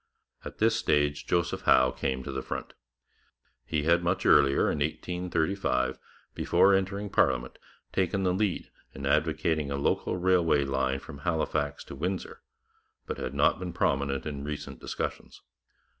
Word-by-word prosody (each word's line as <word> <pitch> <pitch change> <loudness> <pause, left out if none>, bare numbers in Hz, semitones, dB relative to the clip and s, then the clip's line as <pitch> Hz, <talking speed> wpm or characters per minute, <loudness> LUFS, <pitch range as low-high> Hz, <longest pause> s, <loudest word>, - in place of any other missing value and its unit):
At - - -8
this - - +3
stage 75 0 +1
Joseph 85 -1 0
Howe 65 0 +5
came 65 0 -2
to 70 - -5
the 65 0 -3
front. - - -6 0.9
He 75 -2 -1
had 85 +2 +3
much 90 +2 0
earlier, 70 -1 +5
in 75 - -2
1835, 85 -3 -1 0.3
before 100 - +4
entering 100 +1 -1
parliament, 65 -2 +1 0.3
taken 95 +1 0
the 90 -1 +2
lead 100 -1 -1 0.2
in 70 - -6
advocating 80 0 +1
a 70 - -2
local 70 +5 0
railway 70 -8 +2
from 70 +1 -10
Halifax 75 -2 -1
to - - -10
Windsor, 95 +1 -4 0.6
but - - -5
had 65 +2 -4
not 70 +4 +3
been 90 -2 -5
prominent 70 0 0
in 70 -2 -5
recent 75 0 -6
discussions. - - -5
75 Hz, 145 wpm, -28 LUFS, 70-90 Hz, 0.9 s, Howe